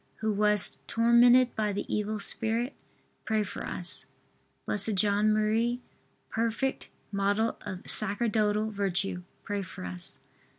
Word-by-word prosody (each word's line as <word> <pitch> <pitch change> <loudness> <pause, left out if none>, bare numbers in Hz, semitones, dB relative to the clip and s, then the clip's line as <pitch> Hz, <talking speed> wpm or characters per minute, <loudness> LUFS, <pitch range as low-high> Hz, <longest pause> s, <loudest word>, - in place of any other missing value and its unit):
who 220 0 -1
wast 210 -1 +3
tormented 240 +2 +5
by 215 -1 0
the 200 - -3
evil 210 0 -2
spirit, 225 +5 0 0.5
pray 220 -1 +1
for 205 - -7
us. 175 - -3 0.6
B. - - 0
J. 205 0 +1
M., 215 +3 +2 0.5
perfect 230 +4 -1 0.2
model 200 +3 +1
of 190 -3 -7
sacerdotal 215 0 +2
virtue, 195 -2 -2 0.2
pray 205 -1 -2
for 185 - -8
us. 90 0 -4
215 Hz, 120 wpm, -29 LUFS, 200-225 Hz, 0.6 s, tormented